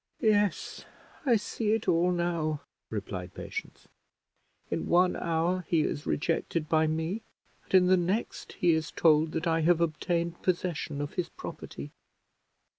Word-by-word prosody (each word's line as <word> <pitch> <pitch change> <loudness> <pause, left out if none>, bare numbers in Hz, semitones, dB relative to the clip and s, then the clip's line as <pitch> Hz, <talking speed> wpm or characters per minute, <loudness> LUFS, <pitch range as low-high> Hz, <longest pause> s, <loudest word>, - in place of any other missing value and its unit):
"Yes, 205 -4 +1 0.4
I 240 - +6
see 215 0 0
it 225 -1 -1
all 170 +2 +3
now," 170 -4 -1 0.3
replied 95 -4 -5
Patience; - - -7 0.8
"in - - -1
one 180 +1 +4
hour 170 +2 0
he 165 -2 +3
is 145 - -2
rejected 165 0 0
by 155 0 +3
me, 160 +7 -1 0.4
and - - 0
in 185 -1 +7
the 185 +1 +5
next 185 +6 -2
he 175 - +3
is 160 -1 0
told 155 -1 +3
that 160 +2 -2
I 165 -1 +2
have 170 +1 +4
obtained 170 +1 -1
possession 170 -5 -1
of 145 - -4
his 180 - -2
property. 70 +2 -8
170 Hz, 145 wpm, -29 LUFS, 155-180 Hz, 0.8 s, in